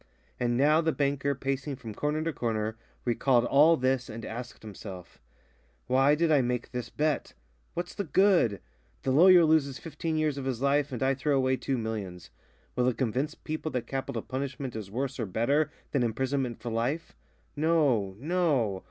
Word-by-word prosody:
And 120 Hz, -1 st, +1 dB
now 150 Hz, +4 st, +4 dB
the 160 Hz, 0 st, +1 dB
banker, 140 Hz, -1 st, 0 dB
pacing 135 Hz, +1 st, -3 dB
from 115 Hz, -4 st, -8 dB
corner 150 Hz, +6 st, -1 dB
to 165 Hz, 0 st, -2 dB
corner, 110 Hz, -3 st, -2 dB, 0.3 s
recalled 120 Hz, 0 st, +2 dB
all 155 Hz, +6 st, +5 dB
this 130 Hz, -1 st, 0 dB
and 115 Hz, 0 st, -7 dB
asked 120 Hz, +1 st, -7 dB
himself: 95 Hz, -4 st, -10 dB, 0.6 s
"Why 135 Hz, +3 st, +4 dB
did 165 Hz, +1 st, +1 dB
I 145 Hz, -3 st, +5 dB
make 125 Hz, -1 st, -2 dB
this 125 Hz, -2 st, -4 dB
bet? 150 Hz, -1 st, -1 dB, 0.4 s
What's 175 Hz, +1 st, -4 dB
the 200 Hz, -, -3 dB
good? 170 Hz, -, +3 dB, 0.4 s
The 135 Hz, -, +1 dB
lawyer 175 Hz, +4 st, +7 dB
loses 150 Hz, -4 st, +2 dB
fifteen 165 Hz, -1 st, -4 dB
years 155 Hz, -3 st, 0 dB
of 135 Hz, -, -5 dB
his 130 Hz, -3 st, -2 dB
life 140 Hz, +1 st, +1 dB
and 125 Hz, -1 st, -3 dB
I 135 Hz, +1 st, +3 dB
throw 140 Hz, +1 st, 0 dB
away 130 Hz, 0 st, +2 dB
two 130 Hz, 0 st, -2 dB
millions. 105 Hz, -, -5 dB, 0.4 s
Will 125 Hz, 0 st, +2 dB
it 125 Hz, -, 0 dB
convince 130 Hz, +5 st, -1 dB
people 155 Hz, 0 st, -4 dB
that 125 Hz, -2 st, -2 dB
capital 135 Hz, -1 st, -4 dB
punishment 130 Hz, -1 st, -4 dB
is 105 Hz, -3 st, -6 dB
worse 130 Hz, +4 st, -3 dB
or 115 Hz, -, -1 dB
better 140 Hz, +10 st, +1 dB, 0.2 s
than 140 Hz, -, +1 dB
imprisonment 125 Hz, +1 st, -1 dB
for 120 Hz, -, -4 dB
life? 125 Hz, +9 st, -2 dB, 0.4 s
No, 145 Hz, -11 st, +2 dB
no! 140 Hz, -, +1 dB
135 Hz, 175 wpm, -28 LUFS, 120-150 Hz, 0.6 s, lawyer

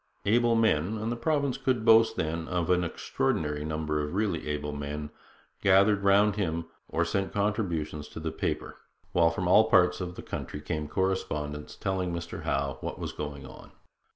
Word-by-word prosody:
Able 115 Hz, +2 st, +3 dB
men 110 Hz, -3 st, +2 dB
and 110 Hz, +2 st, -2 dB
the -, -, -1 dB
province 140 Hz, +1 st, 0 dB
could 125 Hz, -4 st, 0 dB
boast 110 Hz, 0 st, +6 dB
then 80 Hz, -1 st, -2 dB
of 90 Hz, 0 st, 0 dB
an 90 Hz, 0 st, +3 dB
extraordinary 75 Hz, -2 st, -1 dB
number 75 Hz, 0 st, -1 dB
of 75 Hz, +4 st, -4 dB
really 100 Hz, -7 st, -1 dB
able 75 Hz, 0 st, -2 dB
men 75 Hz, +1 st, -5 dB, 0.5 s
gathered 100 Hz, +1 st, +5 dB
round 100 Hz, +1 st, +4 dB
him 85 Hz, -4 st, -1 dB, 0.2 s
or -, -, +1 dB
sent 95 Hz, 0 st, -1 dB
contributions 85 Hz, -8 st, -1 dB
to -, -, -9 dB
the 80 Hz, 0 st, -3 dB
paper, -, -, -3 dB, 0.3 s
while 85 Hz, -1 st, +4 dB
from 90 Hz, +2 st, -2 dB
all 110 Hz, +5 st, +6 dB
parts 90 Hz, -5 st, +4 dB
of 90 Hz, -1 st, -5 dB
the -, -, -8 dB
country 75 Hz, -, -5 dB
came 75 Hz, 0 st, -3 dB
correspondence, 75 Hz, -4 st, -2 dB
telling 95 Hz, -2 st, -2 dB
Mr 85 Hz, -1 st, -5 dB
Howe 70 Hz, -1 st, -1 dB
what -, -, -4 dB
was -, -, -4 dB
going 75 Hz, -2 st, -6 dB
on. 65 Hz, -, -13 dB
90 Hz, 175 wpm, -28 LUFS, 75-105 Hz, 0.5 s, boast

